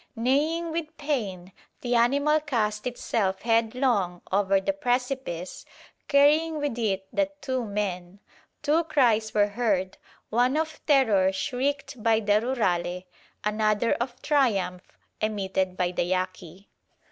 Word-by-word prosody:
Neighing 300 +8 +1
with 320 -1 -4
pain, 205 -12 -3 0.3
the 245 -1 -1
animal 280 +6 +3
cast 225 -8 -1
itself 205 -5 -2
headlong 225 -5 +1
over 195 0 +3
the 240 +10 -1
precipice, 250 - -2 0.4
carrying 300 +3 +4
with 290 -4 -2
it 195 -4 -1
the 295 -1 +1
two 260 -3 -2
men. 200 -3 -4 0.4
Two 315 +3 +3
cries 230 -8 +2
were 205 -1 +4
heard, 200 -4 -1 0.3
one 250 +5 +2
of 315 0 -3
terror 220 -10 +4
shrieked 265 +5 -2
by 225 0 +3
the 210 0 +2
Rurale, 180 -8 -1 0.4
another 215 +1 +1
of 245 +1 -4
triumph 200 -11 0 0.2
emitted 190 -3 -1
by 180 -1 0
the 175 - -1
Yaqui. 185 0 -4
225 Hz, 125 wpm, -26 LUFS, 195-275 Hz, 0.4 s, carrying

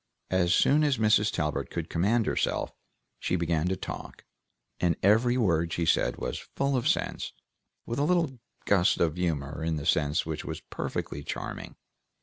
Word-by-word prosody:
As 90 -2 +2
soon 150 +3 +4
as 145 -4 +2
Mrs. 105 -1 +3
Talbert 75 -1 -2
could 85 -1 -4
command 105 +7 +1
herself, - - -1 0.5
she 90 - 0
began 85 -1 0
to 95 - +1
talk, - - -8 0.5
and 85 -2 +2
every 115 +5 +4
word 85 -8 +2
she 85 - -1
said - - +2
was - - -5
full 140 0 +1
of 125 - 0
sense, - - -1 0.5
with 120 - -3
a - - +2
little 160 -6 +1 0.3
gust 95 -2 +3
of 80 -2 +2
humor 80 -4 -2
in 80 0 0
the 75 -1 -4
sense 75 +2 +2
which 80 -1 -4
was - - -5
perfectly 70 - -4
charming. - - -6
90 Hz, 165 wpm, -28 LUFS, 80-115 Hz, 0.5 s, soon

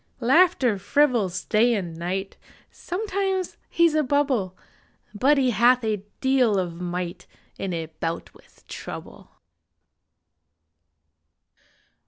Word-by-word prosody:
Laughter 260 - +3
frivols 220 -8 +1
day 230 +2 +3
and 175 -5 -4
night; 185 +4 -4 0.4
Sometimes 385 -1 -3
he 340 - +3
s 330 - +3
a 310 - +3
bubble, 260 -9 0 0.6
But 270 +8 +3
he 260 -2 +3
hath 240 +3 +4
a 215 -3 -1 0.2
deal 260 -6 +3
of 175 -2 -3
might 175 0 -4 0.3
In 195 - -3
a 165 -2 -3
bout 165 +1 -5
with - - -23
Trouble! - - -9
235 Hz, 110 wpm, -24 LUFS, 185-285 Hz, 0.6 s, hath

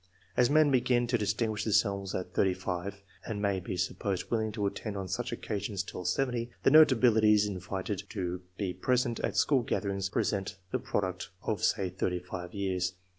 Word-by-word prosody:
As 125 - +4
men 150 0 +5
begin 125 -1 +3
to 120 +1 +1
distinguish 110 +1 0
themselves 100 -3 +1
at 90 -1 -4
35, 95 +1 -1 0.2
and 110 -3 -3
may 100 -2 +1
be 90 0 -5
supposed 95 +1 -2
willing 110 -2 +1
to 105 -2 -1
attend 100 +1 -3
on 95 -1 -4
such 120 +7 -2
occasions 100 -3 -3
till 90 -1 -7
70, 120 +4 0
the - - +5
notabilities 115 -8 +6
invited 95 +1 -3
to 90 -4 -3 0.2
be 95 -3 -2
present 120 +5 0
at - - -2
school 140 -4 +4
gatherings 100 -4 -1
represent 95 -1 -1
the 130 - 0
product 95 -8 -2
of, 110 - -2
say, 95 -2 +2
35 90 -1 -3
years. 95 -2 -1
100 Hz, 165 wpm, -30 LUFS, 95-120 Hz, 0.2 s, notabilities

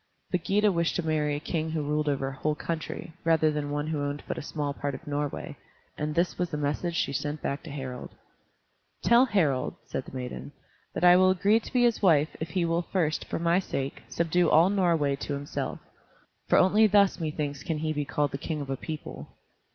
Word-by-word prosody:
But 180 -2 0
Gyda 205 +1 +3
wished 170 -2 0
to 175 - -1
marry 150 -2 +1
a - - -3
king 160 +1 -2
who 155 -1 -2
ruled 150 +1 0
over 135 -1 -1
a 135 - -8
whole 150 +2 -1
country, 165 +1 -5
rather 160 -1 +3
than 150 -1 -3
one 145 0 -2
who 155 -2 -2
owned 145 0 -3
but - - -2
a - - -5
small 145 -1 -3
part 140 -1 -3
of - - -11
Norway, 145 -1 -3 0.4
and 150 0 -3
this 170 +2 0
was 180 -1 0
the 150 - -3
message 150 +4 -1
she 140 - 0
sent 145 +3 -3
back 140 - -2
to 165 - -10
Harald: 130 -3 -6 0.9
"Tell 235 +2 +6
Harald," 155 - +1
said - - -4
the - - -11
maiden, 130 +3 -6 0.4
"that - - -2
I 180 0 +8
will 185 0 +5
agree 200 +4 +3
to - - -11
be 250 -2 +3
his 235 -2 +2
wife 160 -6 +4
if 160 - -4
he 180 -1 0
will 165 +1 +1
first, 160 -5 0
for - - -3
my 170 +2 +2
sake, 140 -7 -4
subdue 170 +1 +2
all 170 +5 +5
Norway 165 -8 +2
to 145 - -4
himself, 140 +1 -4 0.7
for - - +5
only 210 +4 +5
thus 200 -1 +4
methinks 150 -3 -3
can 160 - -2
he 155 0 -1
be 150 -1 -1
called 145 0 -1
the 135 - -4
king 155 +1 -3
of 140 -2 -5
a 135 - -2
people." 155 +2 -7
155 Hz, 220 wpm, -28 LUFS, 145-175 Hz, 0.9 s, I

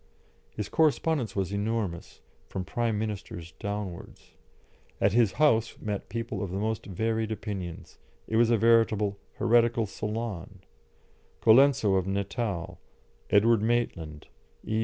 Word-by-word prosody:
His 105 -2 -5
correspondence 155 -6 +1
was 95 -2 -1
enormous, 100 -4 -3 0.3
from 95 -1 -5
Prime 115 -1 -1
Ministers 100 -6 -5
downwards. 100 -4 -6 0.7
At 100 0 +3
his 115 -3 +3
house 115 -7 +2
met 105 -2 -4
people 115 +3 -4
of 100 - -3
the 95 - -4
most 110 +1 -2
varied 110 +3 -1
opinions; 95 -6 -6 0.3
it 110 - -2
was 115 0 +4
a 120 - +4
veritable 110 -3 +3 0.2
heretical 115 -1 +3
salon. 105 -3 -5 0.8
Colenso 115 -4 +5
of 95 0 -1
Natal, 95 -3 -3 0.5
Edward 110 +1 +4
Maitland, 85 -10 -1 0.4
E. 110 0 0
110 Hz, 120 wpm, -28 LUFS, 95-115 Hz, 0.8 s, Colenso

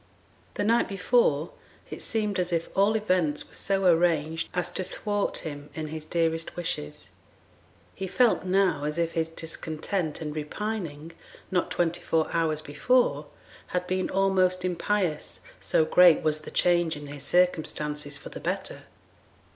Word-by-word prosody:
The - - -1
night 230 +3 +3
before 195 - +2 0.4
it - - -5
seemed 210 -4 -1
as 180 0 -1
if 165 -1 -2
all 200 +3 +4
events 185 -8 +1
were - - -19
so 195 -1 0
arranged 165 -2 +2
as 180 -1 -1
to 185 - -2
thwart 205 +2 -2
him 145 -1 -6
in 155 -1 -4
his 155 0 -6
dearest 165 0 -1
wishes; 165 - -4 0.8
he 190 - -5
felt 240 +4 +3
now 185 -5 +2
as 150 +2 -2
if 170 -1 0
his 165 -1 -1
discontent 160 +1 -3
and 150 -2 -5
repining, 165 -1 -4 0.4
not 180 -1 +1
twenty 170 0 0
four 160 -1 +1
hours 160 -2 +1
before, 150 - +1 0.4
had 180 0 -2
been 185 0 -1
almost 185 -1 +2
impious, 180 -3 -1 0.2
so 160 - +2
great 175 -1 +6
was 155 -1 +1
the 155 - -9
change 175 -2 +2
in 145 0 -8
his 145 0 -8
circumstances 150 -3 0
for - - -9
the - - -8
better. - - -4
170 Hz, 150 wpm, -27 LUFS, 155-185 Hz, 0.8 s, great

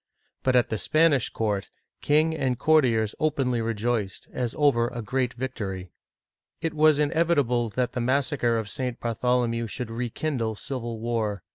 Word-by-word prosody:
But 130 -1 +2
at 120 -2 +4
the 110 - -2
Spanish 155 -5 +3
court, 105 -3 -2 0.3
king 155 +2 +3
and 130 -5 0
courtiers 125 -8 +3
openly 135 -6 +1
rejoiced, 115 -2 -2
as 125 -1 -2
over 135 -6 +3
a 120 - -6
great 125 +1 -1
victory. 100 -8 -5 0.7
It 165 -1 -2
was 155 -1 +5
inevitable 145 -6 +2
that 125 +3 -1
the 125 - -3
massacre 130 -1 +1
of 110 -2 -3
St. 125 +3 -3
Bartholomew 120 0 0
should 115 +2 -5
rekindle 120 0 -2
civil 120 -1 -5
war. 110 -4 -2
125 Hz, 145 wpm, -26 LUFS, 115-140 Hz, 0.7 s, was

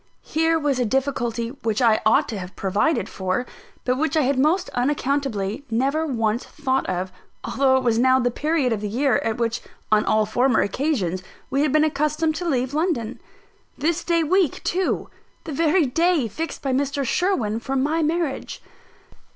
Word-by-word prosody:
Here 325 +1 +2
was 290 -4 0
a - - +2
difficulty 240 -2 -1
which 220 -2 0
I 230 -4 +4
ought 220 - +4
to 215 - -4
have 180 0 -8
provided 205 - 0
for; 190 +5 -2 0.4
but 255 +1 +1
which 315 +1 0
I 310 - +4
had 265 0 +1
most 345 +7 +2
unaccountably 265 -4 -1
never 275 +8 0
once 225 -3 0
thought 270 -3 -2
of, 185 0 -2 0.3
although 265 -1 +2
it 260 - -1
was 230 -2 +2
now 260 +1 +5
the 245 -1 +1
period 295 -2 0
of 210 - -3
the 210 - -3
year 265 +6 +2
at 225 -6 -2
which 235 0 -1 0.3
on 215 0 +4
all 215 0 +2
former 245 0 +2
occasions 200 - -1 0.3
we 275 +1 +1
had 300 -2 +2
been 310 +1 +4
accustomed 305 +1 +1
to 350 -1 -2
leave 260 -1 0
London. 295 -8 -1 0.6
This 315 +3 0
day 335 -1 +2
week 360 -1 +1
too! 370 +1 -1 0.4
The 320 - -6
very 325 +3 +3
day 325 0 +2
fixed 320 +10 -5
by 270 -2 0
Mr. 280 +1 0
Sherwin 240 - 0
for 265 +4 -4
my 300 +5 +1
marriage! 320 -2 -2
270 Hz, 175 wpm, -23 LUFS, 230-310 Hz, 0.6 s, now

